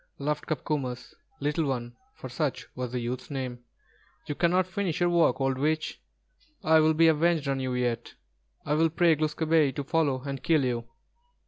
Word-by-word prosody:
laughed 150 +1 -2
"Copcomus," 135 -4 -3 0.3
Little 150 +3 0
One, 120 -3 -3 0.2
for - - -8
such 135 +2 -2
was 125 -1 -4
the 125 - -2
youth's 120 +2 -4
name. 130 -3 -4 0.7
"You - - -3
cannot 175 +4 +2
finish 185 -3 -2
your 175 0 +2
work, 165 -7 +3
old 135 -1 0
witch. 155 +2 -1 0.6
I 160 0 +5
will 155 0 +4
be 165 +1 +5
avenged 160 -1 +2
on 135 -1 0
you 130 -1 -2
yet. 120 -2 -2 0.5
I 145 - 0
will 160 +2 +3
pray 165 0 +3
Glūs 155 0 -1
kābé 155 -4 +2
to 145 - -2
follow 145 -4 0
and 135 -2 -5
kill 155 -5 +2
you." 120 -2 -2
145 Hz, 180 wpm, -28 LUFS, 130-160 Hz, 0.7 s, I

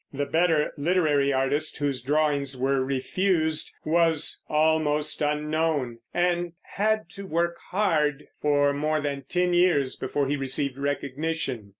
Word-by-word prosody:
The 145 +1 -2
better 160 -1 +2
literary 145 -3 +2
artist, 140 +3 0
whose 140 -3 -1
drawings 140 -1 0
were 135 +1 +1
refused, 160 +4 0 0.2
was 165 -1 +1
almost 155 -1 +2
unknown, 150 -4 0
and 175 -1 0 0.2
had 215 -1 +1
to 195 0 -8
work 170 0 0
hard 150 -7 +1 0.2
for 145 -1 +3
more 155 +2 0
than 140 -2 -4
ten 180 0 +1
years 175 -7 +3
before 140 -2 -2
he 145 - 0
received 135 0 -1
recognition. 140 -4 -2
150 Hz, 125 wpm, -26 LUFS, 140-165 Hz, 0.2 s, for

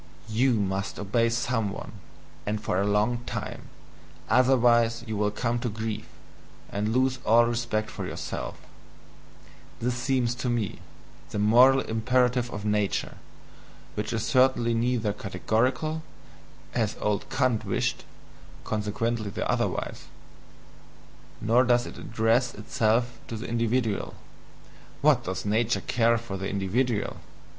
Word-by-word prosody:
"Thou 120 +4 +2
must 95 -2 -1
obey 115 +4 +1
some 115 -2 0
one, 100 - -7 0.6
and 105 0 0
for 95 -3 0
a 100 - +1
long 105 +4 +2
time; - - -5 0.6
OTHERWISE 120 -2 +4
thou 115 -2 -6
wilt 105 0 0
come 120 -1 0
to 120 - -2
grief, 110 0 -4 0.6
and 105 +2 -1
lose 130 +2 +2
all 115 +2 +5
respect 115 -2 -1
for - - -5
thyself" - - -5 1.2
this 125 +2 0
seems 125 -1 0
to 125 0 -3
me 115 -4 0
to - - -11
be - - -15 0.5
the - - -4
moral 125 +6 +6
imperative 125 +2 +1
of 105 0 -5
nature, 105 -1 0 0.8
which 105 0 -3
is 115 -2 -1
certainly 125 -3 +3
neither 115 -2 +1
"categorical," 125 +11 -1 0.7
as 110 -1 0
old 105 -1 -1
Kant 130 -5 +1
wished - - -1 0.6
(consequently 110 +1 -2
the - - -3
"otherwise"), - - -1 1.3
nor 115 +4 +4
does 120 0 +3
it - - -9
address 115 -2 +1
itself 115 +3 0
to 115 - -5
the - - -6
individual 115 -2 0 0.9
(what 140 -4 +4
does 95 +2 -3
nature 110 +3 +1
care 115 0 +2
for 115 -4 -5
the 95 0 -3
individual!) 100 +2 0
115 Hz, 130 wpm, -27 LUFS, 105-125 Hz, 1.3 s, moral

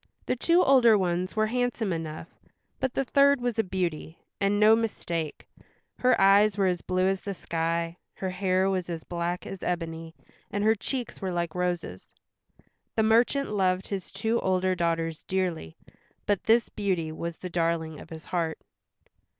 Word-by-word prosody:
The - - 0
two 340 +8 +3
older 240 -5 +6
ones 180 0 -1
were 215 0 +3
handsome 240 -3 -1
enough, 160 -1 -5 0.5
but 260 -1 -2
the 270 - 0
third 280 +2 +4
was 240 -2 -2
a - - +4
beauty, 175 -4 -3 0.2
and 200 0 +2
no 215 +1 +7
mistake; 170 -8 -3 0.5
her 255 0 +3
eyes 200 +2 +5
were 195 - +2
as 180 -2 0
blue 185 0 0
as 195 0 0
the 200 -1 -5
sky, 165 0 -2 0.2
her 190 -1 -3
hair 185 0 +1
was 185 -2 -1
as 165 -2 -4
black 175 +1 -3
as 195 - -7
ebony, 165 -2 -4 0.3
and 205 0 -2
her 220 +1 +5
cheeks 245 +3 -5
were 190 -1 -2
like 170 -2 -2
roses. 175 - -3 0.8
The 220 - +3
merchant 235 +4 +3
loved 185 -2 0
his 195 -2 -5
two 225 +3 0
older 185 0 +1
daughters 165 -2 -1
dearly, 180 - -2 0.5
but 205 -2 0
this 230 +1 +4
Beauty 180 -6 -2
was 170 +1 -5
the 180 - -6
darling 165 -2 -1
of - - -12
his 160 0 -9
heart. 165 -3 -1
185 Hz, 165 wpm, -27 LUFS, 170-215 Hz, 0.8 s, no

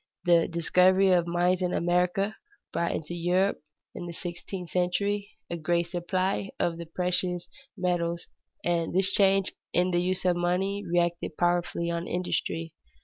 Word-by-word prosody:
The 170 -2 +4
discovery 185 +3 +4
of 175 -2 +3
mines 175 +2 +2
in 180 -1 0
America 180 +4 +1 0.4
brought 170 - 0
into 160 +2 -4
Europe, 180 +3 +1 0.3
in 175 - -6
the 170 - -6
sixteenth 175 0 -6
century, 200 +3 0 0.2
a 170 - -4
great 170 +1 0
supply 185 +3 -1
of 170 -1 0
the 170 - -6
precious 180 +1 -1 0.3
metals, 170 -2 -1 0.4
and 170 -1 0
this 190 +1 +3
change 195 -1 +3 0.2
in 180 +1 +3
the 175 0 +2
use 185 +1 -1
of 180 -1 +4
money 190 +3 0
reacted 175 -2 0
powerfully 175 -1 +1
on 170 0 -3
industry. 165 -2 -2
175 Hz, 145 wpm, -28 LUFS, 170-185 Hz, 0.4 s, The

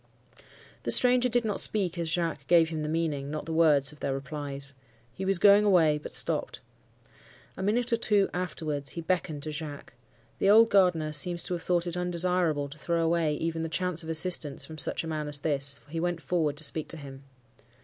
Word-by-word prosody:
"The - - -5
stranger 250 0 +7
did 240 0 0
not 210 -2 -1
speak 185 -5 0
as 165 -1 -2
Jacques 165 -5 -2
gave 165 -2 +4
him 160 -2 -4
the 150 - -3
meaning, 155 -4 -2
not 150 0 -5
the 165 - -5
words, 150 -4 +3
of 150 - -17
their 135 - -2
replies. 140 0 -5 0.4
He 190 - -6
was 195 -1 +1
going 205 +2 +6
away, 165 -7 +3
but - - -9
stopped. - - -1 1.0
A - - -7
minute 230 +5 0
or - - +3
two 205 -3 +2
afterwards, 155 -6 -3
he 170 - -5
beckoned 160 -4 -2
to 155 - -5
Jacques. 150 -3 -8 0.5
The 195 - +2
old 225 +2 +6
gardener 175 -6 +2
seems 175 +3 0
to - - -4
have 175 - -4
thought 175 0 0
it 175 -1 -4
undesirable 180 -4 0
to 150 +2 -12
throw 170 +2 -1
away 165 -2 +1
even 165 +2 -3
the 165 - -4
chance 180 0 -1
of 160 - -8
assistance 160 -3 0
from 155 -1 -9
such - - 0
a - - -6
man 155 -2 -4
as 145 -1 -2
this, 140 -2 +1
for 145 - -22
he 165 - -3
went 175 0 -2
forward 155 -1 -1
to 155 - -4
speak 155 +1 -1
to 165 - -6
him. 135 -2 -11
165 Hz, 210 wpm, -27 LUFS, 150-180 Hz, 1.0 s, stranger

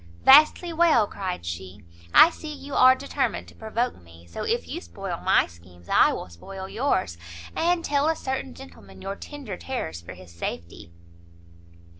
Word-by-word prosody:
"Vastly 310 +5 +6
well!" 320 -9 +4
cried 185 - -5
she, 95 +3 -7 0.3
"I 330 - +8
see 310 -2 -8
you 285 -1 -9
are 255 0 +7
determined 280 +1 -2
to - - -18
provoke 225 - -3
me, 85 0 -17
so 85 - -8
if - - -1
you - - -5
spoil 85 0 -6
my - - +3
schemes, 85 0 -18
I - - +5
will - - -5
spoil 190 - -9
yours, 190 - -1 0.4
and 340 0 +1
tell 285 +1 +2
a 325 - +1
certain 260 - -4
gentleman 95 +2 -13
your 195 - -4
tender 265 -7 -8
terrors 85 - -5
for 85 - -10
his 90 -2 -14
safety." 85 0 -7
190 Hz, 165 wpm, -25 LUFS, -, 0.4 s, I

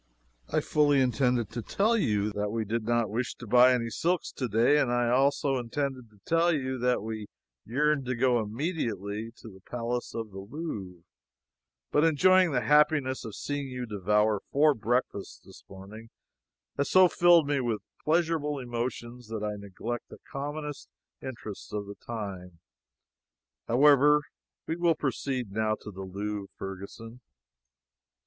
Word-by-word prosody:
I - - +2
fully 145 -2 +3
intended 125 -3 +1
to 120 - -4
tell 215 - +1
you 105 - +1
that 105 0 -2
we 110 +1 -2
did 110 +2 -2
not 120 -2 +1
wish 120 +3 -2
to 120 - -10
buy 125 +3 +6
any 115 -2 0
silks 175 +5 0
to 130 - -3
day, 115 +7 +4
and 130 -4 +1
I 120 -1 +2
also 135 +2 +2
intended 130 0 -3
to 105 - -23
tell 165 +1 +3
you 130 -4 -2
that 125 -3 +1
we 110 -1 -5 0.4
yearned 145 +3 +1
to 130 - -1
go 125 0 +3
immediately 110 - -3
to - - -13
the 95 -2 -14
palace 120 +4 -4
of 115 -2 -4
the 95 - -8
Louvre, 100 - -6 0.9
but 150 - +3
enjoying 185 +3 +5
the 125 -5 0
happiness 150 0 +3
of 110 -4 -7
seeing 145 -1 -3
you 125 -1 -5
devour 105 0 +1
four 150 +2 +5
breakfasts 115 -3 -2
this - - -15
morning 100 +4 -11 0.7
has 140 - 0
so 185 0 +7
filled 175 -3 +5
me 145 -1 +1
with 115 -5 -2 0.2
pleasurable 160 -2 +1
emotions 120 -1 -5
that 110 -1 -4
I 105 0 -1
neglect 105 +4 -6
the - - -11
commonest 145 +1 -5 0.3
interests 120 -6 -8
of 105 -1 -3
the 100 - -8
time. 95 -5 -7 1.1
However, 145 +3 +5 0.4
we 160 - -2
will 170 -2 +3
proceed 130 -4 -2
now 110 +1 0
to 105 - -9
the 95 0 -8
Louvre, 100 +1 -4
Ferguson." 100 +5 -8
120 Hz, 155 wpm, -28 LUFS, 105-145 Hz, 1.1 s, so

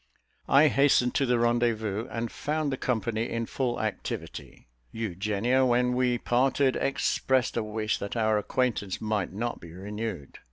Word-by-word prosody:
I 145 +3 +6
hastened 140 -4 +3
to 135 - +1
the 125 0 +3
rendezvous, 115 -2 0
and 115 0 -4
found 150 -1 -2
the 135 - -2
company 115 -2 -1
in 115 0 -2
full 120 0 -2
activity. 110 -2 -5 0.3
Eugenia, 110 +4 0
when 125 0 +2
we 125 -1 +2
parted, 130 +3 +2
expressed 130 -2 0
a 115 - +1
wish 110 0 -2
that 100 - -5
our 110 -1 +2
acquaintance 105 -4 -1
might 105 -3 -1
not 115 +5 -3
be 85 - -11
renewed. 100 -4 -6
115 Hz, 150 wpm, -27 LUFS, 110-125 Hz, 0.3 s, I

